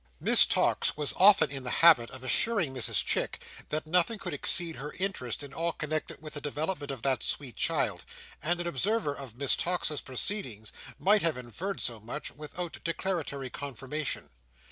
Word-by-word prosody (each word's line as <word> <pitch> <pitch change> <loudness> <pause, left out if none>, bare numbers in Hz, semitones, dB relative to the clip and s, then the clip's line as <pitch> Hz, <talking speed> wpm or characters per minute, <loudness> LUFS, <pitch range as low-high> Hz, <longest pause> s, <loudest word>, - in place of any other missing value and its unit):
Miss - - +7
Tox - - +1
was 150 -2 +2
often 195 -3 +6
in 135 -2 -5
the 125 - -4
habit 155 -9 +5
of 130 -1 -11
assuring 175 - +1
Mrs 130 -4 -1
Chick, - - -1 0.3
that 155 +1 -3
nothing 180 +7 +1
could 180 -5 -5
exceed 165 +3 +4
her 150 +2 -7
interest 180 - -3
in 140 -1 -10
all 165 +3 -1
connected 155 0 -4
with 155 - -8
the 145 - -7
development 150 +1 -3
of 135 -4 -6
that 130 -4 +1
sweet 130 -7 -1
child; - - 0 0.4
and 175 +3 0
an 175 - -3
observer 175 - 0
of 135 -5 -9
Miss 140 0 +3
Tox's 170 -4 -1
proceedings 130 - -1 0.2
might 205 +2 +3
have 165 -5 +1
inferred 145 - -5
so 115 -2 -2
much 120 +8 -6
without 155 +3 -7
declaratory 165 -6 -3
confirmation. 140 +2 -5
150 Hz, 170 wpm, -29 LUFS, 135-175 Hz, 0.4 s, Miss